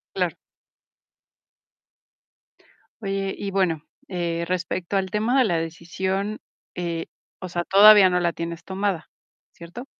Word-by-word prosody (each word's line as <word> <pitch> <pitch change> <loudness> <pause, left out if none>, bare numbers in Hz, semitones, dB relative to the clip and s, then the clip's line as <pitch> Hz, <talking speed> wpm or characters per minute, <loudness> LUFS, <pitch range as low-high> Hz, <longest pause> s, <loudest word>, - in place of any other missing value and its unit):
Claro. - - 0 2.7
Oye, 195 -1 -2
y 200 - -4
bueno, 180 -6 0 0.2
eh, 170 -2 -2
respecto 180 +1 -2
al 190 -1 -2
tema 220 +5 +1
de 260 - +5
la 175 -5 +1
decisión, 190 +5 -3 0.3
eh, 170 -2 -3 0.3
o 185 - -6
sea, 175 -1 -2
todavía 200 +1 +8
no 180 0 +1
la 170 -1 0
tienes 170 0 -5
tomada, 190 -3 -3 0.4
¿cierto? 175 +10 -10
185 Hz, 120 wpm, -24 LUFS, 170-195 Hz, 2.7 s, todavía